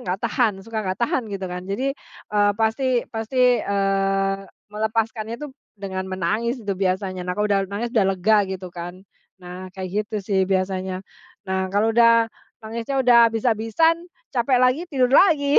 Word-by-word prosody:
enggak 190 Hz, +3 st, -1 dB
tahan, 230 Hz, -2 st, +2 dB
suka 225 Hz, -1 st, -3 dB
enggak 185 Hz, -2 st, -2 dB
tahan, 235 Hz, -1 st, 0 dB
gitu 195 Hz, -2 st, -5 dB
kan. 180 Hz, 0 st, -5 dB
Jadi, 260 Hz, +7 st, -1 dB, 0.4 s
eee, 205 Hz, -1 st, +4 dB
pasti 240 Hz, +3 st, +1 dB
pasti, 245 Hz, +1 st, +2 dB
eee, 195 Hz, 0 st, 0 dB, 0.3 s
melepaskannya 220 Hz, +1 st, -2 dB
itu, 295 Hz, -, -6 dB, 0.3 s
dengan 190 Hz, -1 st, -4 dB
menangis 215 Hz, +7 st, -1 dB
itu 200 Hz, -, -1 dB
biasanya. 185 Hz, 0 st, -1 dB
Nah, -, -, +1 dB
kalau 210 Hz, -, +1 dB
udah 195 Hz, -, +3 dB
nangis, 230 Hz, +4 st, -4 dB
udah 210 Hz, -6 st, +3 dB
lega, 215 Hz, +4 st, +3 dB
gitu 190 Hz, -1 st, -5 dB
kan. 175 Hz, +2 st, -8 dB, 0.4 s
Nah, 180 Hz, +1 st, -8 dB
kayak 185 Hz, -1 st, -4 dB, 0.2 s
gitu 215 Hz, -, -4 dB
sih, 195 Hz, -2 st, +1 dB
biasanya. 190 Hz, 0 st, -1 dB, 0.4 s
Nah, 190 Hz, 0 st, -1 dB
kalau 210 Hz, +3 st, +1 dB
udah, 230 Hz, 0 st, +5 dB, 0.4 s
nangisnya 230 Hz, +5 st, -4 dB
udah 235 Hz, -1 st, +7 dB
habis-habisan, 225 Hz, +8 st, +2 dB, 0.4 s
capek 250 Hz, +1 st, +2 dB
lagi, 255 Hz, +5 st, +3 dB
tidur 255 Hz, -4 st, +1 dB
lagi. 290 Hz, -5 st, +5 dB
215 Hz, 160 wpm, -22 LUFS, 190-235 Hz, 0.4 s, udah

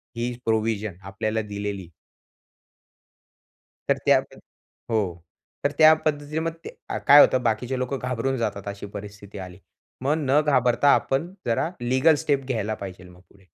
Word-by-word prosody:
ही 120 Hz, +1 st, -2 dB
provision 110 Hz, -2 st, 0 dB
आपल्याला 110 Hz, +3 st, -2 dB
दिलेली. 100 Hz, -3 st, -5 dB, 2.0 s
तर -, -, +2 dB
त्या -, -, +6 dB, 0.7 s
हो, 110 Hz, -, +3 dB, 0.6 s
तर 145 Hz, -, +2 dB
त्या 155 Hz, 0 st, +8 dB
पद्धतीने 150 Hz, 0 st, -1 dB
मग 165 Hz, +1 st, -1 dB, 0.4 s
अ, -, -, -2 dB
काय 145 Hz, +1 st, +10 dB
होतं, 130 Hz, -1 st, +4 dB
बाकीचे 120 Hz, +3 st, -1 dB
लोकं 130 Hz, +2 st, -2 dB
घाबरून 125 Hz, +1 st, -1 dB
जातात, 105 Hz, -3 st, -3 dB
अशी 100 Hz, 0 st, -6 dB
परिस्थिती 100 Hz, 0 st, -10 dB
आली. 90 Hz, +1 st, -14 dB, 0.4 s
मग 140 Hz, +3 st, +1 dB
न 145 Hz, -1 st, +2 dB
घाबरता 125 Hz, -1 st, +3 dB
आपण 165 Hz, +8 st, -1 dB
जरा 115 Hz, +7 st, 0 dB
लीगल 130 Hz, +6 st, +3 dB
स्टेप 140 Hz, -2 st, +1 dB
घ्यायला 110 Hz, -4 st, -2 dB
पाहिजे 95 Hz, -1 st, -8 dB
मग 90 Hz, 0 st, -16 dB
पुढे. 95 Hz, -2 st, -23 dB
120 Hz, 140 wpm, -24 LUFS, 105-135 Hz, 2.0 s, काय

